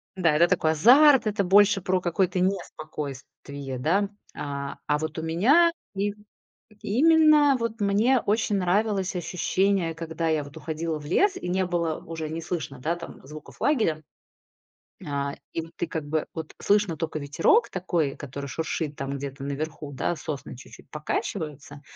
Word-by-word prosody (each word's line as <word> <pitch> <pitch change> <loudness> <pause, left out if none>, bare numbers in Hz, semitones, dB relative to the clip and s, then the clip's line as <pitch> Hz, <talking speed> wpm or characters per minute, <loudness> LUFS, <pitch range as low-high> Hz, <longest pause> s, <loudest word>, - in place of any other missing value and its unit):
Да, 170 -5 +2
это 170 +3 +5
такой 155 -2 +2
азарт, 265 - +6
это 210 -1 0
больше 200 +1 +5
про 185 +1 +1
какое-то 180 +1 0
неспокойствие, 145 -6 -4
да? 195 +9 +1 0.3
А, 140 -1 -5
а, 150 - +1
вот 155 0 -4
у - - -5
меня 255 - +4 0.2
им 205 +1 -3 0.6
и 210 +4 -2
именно 305 -2 +6
вот 230 -1 -3
мне 210 +6 +3
очень 210 -1 0
нравилось 195 +1 +1
ощущение, 180 0 0
когда 165 0 -3
я 155 -2 +1
вот 145 +2 -12
уходила 160 0 -3
в 150 - -11
лес 375 - +2
и 180 - -5
не 185 +1 +1
было 170 -3 -1
уже, 160 -1 -5
не 160 +1 -4
слышно, 160 -5 -5
да, 165 +6 -1
там 170 - -10
звуков 150 +1 -12
лагеря. 215 - +1 1.0
На 140 -4 -3 0.2
и 165 - -2
вот 165 +1 -12
ты, 175 - -2
как 160 -2 -4
бы, 155 +1 -1
вот 160 -2 -6
слышно 205 -5 +2
тока 155 -1 -3
ветерок 425 - +2
такой, 170 -6 -1
который 140 0 -7
шуршит 160 0 -3
там 140 0 -4
где-то 135 0 -7
наверху, 150 +1 -4
да, 140 +5 -1
сосны 145 -3 -6
чуть-чуть 130 - -14
покачиваются. 150 -2 -4
165 Hz, 160 wpm, -26 LUFS, 150-200 Hz, 1.0 s, азарт